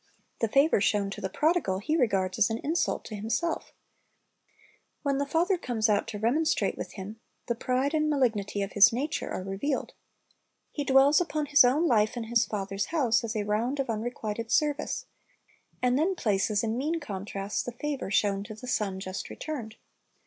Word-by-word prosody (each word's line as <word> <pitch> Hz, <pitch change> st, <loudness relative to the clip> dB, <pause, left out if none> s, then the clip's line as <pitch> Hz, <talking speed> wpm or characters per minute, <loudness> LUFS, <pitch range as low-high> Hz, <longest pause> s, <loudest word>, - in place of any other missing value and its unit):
The 225 Hz, -, +1 dB
favor 275 Hz, -1 st, +3 dB
shown 200 Hz, -1 st, +1 dB
the 190 Hz, -, -4 dB
prodigal 300 Hz, -, +1 dB
he 290 Hz, +11 st, -1 dB
regards 195 Hz, -, +1 dB
as 215 Hz, -, +4 dB
an 225 Hz, -, -1 dB
insult 320 Hz, +4 st, 0 dB
to 215 Hz, -, -6 dB
himself 230 Hz, +11 st, -2 dB, 1.3 s
When 275 Hz, -1 st, 0 dB
the 285 Hz, -, -1 dB
father 345 Hz, +5 st, +1 dB
comes 225 Hz, -5 st, 0 dB
out 205 Hz, -1 st, +2 dB
to 215 Hz, -, -5 dB
remonstrate 270 Hz, +10 st, +1 dB
with -, -, -7 dB
him, 210 Hz, +3 st, -8 dB, 0.3 s
the 235 Hz, -, 0 dB
pride 255 Hz, +4 st, -1 dB
and 305 Hz, -1 st, +2 dB
malignity 220 Hz, -8 st, 0 dB
of 195 Hz, -, -5 dB
his 205 Hz, +2 st, +7 dB
nature 285 Hz, +7 st, -2 dB
are 185 Hz, -, -4 dB
revealed. 195 Hz, +9 st, -2 dB, 0.8 s
He 290 Hz, -, -3 dB
dwells 275 Hz, +3 st, +5 dB
upon 310 Hz, -3 st, -1 dB
his 290 Hz, -1 st, +6 dB
own 270 Hz, +7 st, +3 dB
life 220 Hz, -5 st, +2 dB
in 235 Hz, -, -2 dB
his 235 Hz, +1 st, +1 dB
father's 200 Hz, -1 st, -3 dB
house 250 Hz, -9 st, +2 dB
as 225 Hz, 0 st, -4 dB
a 210 Hz, -, 0 dB
round 225 Hz, +7 st, -1 dB
of 265 Hz, -4 st, 0 dB
unrequited 225 Hz, 0 st, -4 dB
service, 300 Hz, 0 st, 0 dB, 0.8 s
and 250 Hz, +2 st, +3 dB
then 365 Hz, +5 st, +1 dB
places 210 Hz, -, +1 dB
in 225 Hz, +2 st, -1 dB
mean 320 Hz, +5 st, -1 dB
contrast 200 Hz, -5 st, -4 dB
the -, -, -2 dB
favor 280 Hz, 0 st, -4 dB
shown 200 Hz, -1 st, +1 dB
to 215 Hz, -, -8 dB
the 220 Hz, -, -10 dB
son 200 Hz, -6 st, -1 dB
just 190 Hz, 0 st, -5 dB
returned. 250 Hz, -8 st, -6 dB
235 Hz, 180 wpm, -28 LUFS, 210-290 Hz, 1.3 s, his